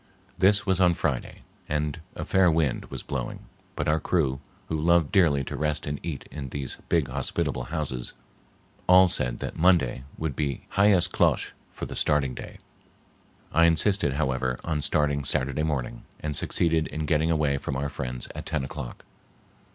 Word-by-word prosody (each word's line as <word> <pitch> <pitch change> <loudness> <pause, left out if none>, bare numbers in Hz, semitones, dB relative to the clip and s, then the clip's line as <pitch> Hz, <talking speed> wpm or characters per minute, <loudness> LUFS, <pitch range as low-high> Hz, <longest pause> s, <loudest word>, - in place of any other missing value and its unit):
This 100 +2 +3
was 95 -2 +1
on 90 -2 +5
Friday 70 -7 -2 0.3
and 75 +1 -1
a - - -4
fair 95 -2 +4
wind 80 -5 +1
was - - -6
blowing, - - -4 0.3
but - - -2
our 75 +1 +3
crew, 70 -7 0 0.2
who 80 -1 -2
loved 85 -1 +3
dearly 85 -9 +4
to - - -5
rest 75 0 0
and 75 -1 -3
eat 80 -4 -5
in 70 -3 -6
these 70 -1 -4
big 80 -6 +2
hospitable 65 0 -2
houses, 65 -4 -3 0.7
all 90 0 +7
said 60 -6 -1
that - - -5
Monday 80 -8 +3
would 80 -4 -3
be 70 -3 -2
hyas 100 -2 +4
klosh - - +1 0.2
for - - -6
the - - -7
starting 70 -4 +2
day. - - -9 0.9
I 85 +3 +5
insisted, 85 -1 +3
however, 65 -3 -1
on 75 -3 -1
starting 70 -1 +1
Saturday 70 +2 0
morning, 75 -6 -2 0.2
and 75 -1 -3
succeeded 80 +3 +1
in 80 0 -4
getting 80 +2 +2
away 75 -4 +1
from 70 - -4
our 70 +1 -1
friends 65 -4 -4
at - - -7
ten 80 -4 -1
o'clock. 65 -2 -7
75 Hz, 165 wpm, -26 LUFS, 70-85 Hz, 0.9 s, all